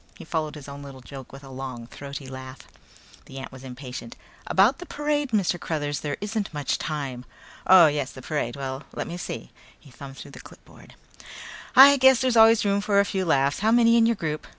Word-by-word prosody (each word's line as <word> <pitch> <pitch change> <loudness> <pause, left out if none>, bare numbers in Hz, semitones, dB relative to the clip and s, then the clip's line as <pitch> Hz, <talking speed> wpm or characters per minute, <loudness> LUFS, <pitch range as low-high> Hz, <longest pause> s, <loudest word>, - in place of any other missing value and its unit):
He - - -11
followed 155 -2 -3
his 145 -2 -10
own 140 0 -9
little 135 -2 -11
joke 135 0 -11
with 135 +1 -12
a 135 - -12
long 130 -3 -7
throaty 140 +3 -9
laugh. 130 0 -9 0.7
The 135 - -11
ant 135 0 -7
was 130 0 -12
impatient. 125 -2 -8 0.3
"About 210 +10 +3
the 360 - -9
parade, 295 -1 -1
Mr. 195 -6 0
Cruthers, 145 -4 -3
there 145 -2 -4
isn't 210 +1 -3
much 145 -3 -2
time." 135 -5 -4 0.4
"Oh, 185 -2 +8
yes, 145 -3 0
the 130 - -12
parade. 125 -6 -3
Well, 135 -1 -5
let - - -4
me 170 - -6
see," 60 - -7 0.3
he 140 - -18
thumbed 135 +1 -11
through 140 - -10
the 125 - -12
clipboard, - - -17 0.8
"I 280 +2 +9
guess 265 -2 +6
there's 255 -2 +1
always 225 -1 +6
room 200 0 +1
for 200 -1 +2
a 200 - +4
few 190 -2 -2
laughs. 140 -3 +1
How 215 - +1
many 230 0 +5
in 230 -1 +5
your 230 - +1
group?" 155 -5 -4
150 Hz, 210 wpm, -25 LUFS, 135-205 Hz, 0.8 s, I